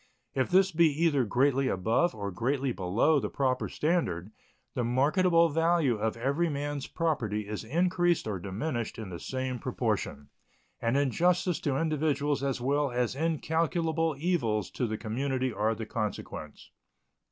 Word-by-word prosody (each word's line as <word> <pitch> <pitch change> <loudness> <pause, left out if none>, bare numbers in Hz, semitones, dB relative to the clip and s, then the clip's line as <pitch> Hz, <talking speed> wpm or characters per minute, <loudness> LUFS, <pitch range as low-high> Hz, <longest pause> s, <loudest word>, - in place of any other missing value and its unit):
If 130 - 0
this 190 +1 +4
be 170 0 +5 0.2
either 145 -6 +3
greatly 135 +4 +2
above 115 - +1
or 100 -2 -4
greatly 130 +6 0
below 115 - +2
the - - -3
proper 130 -2 0
standard, 110 - -1 0.4
the 125 - -1
marketable 165 +8 +3
value 165 -4 +2
of 110 +1 -1
every 140 +8 0
man's 145 -1 -3
property 110 -11 -1
is 105 +1 -4
increased 175 +4 +1
or 100 -3 -2
diminished 110 - -3
in 110 -4 -6
the 85 - -6
same 130 -1 -3
proportion, 70 -8 -2 0.5
and 115 +3 +1
injustice 170 +5 +2
to 140 -5 -1
individuals 150 -2 0
as 135 -2 -1
well 140 +3 +1
as 125 -1 0
incalculable 160 +1 0
evils 135 - 0
to 125 - -1
the 110 0 -3
community 130 +3 -2
are 110 +2 0
the 110 - -5
consequence. 105 -2 -5
135 Hz, 145 wpm, -29 LUFS, 115-160 Hz, 0.5 s, be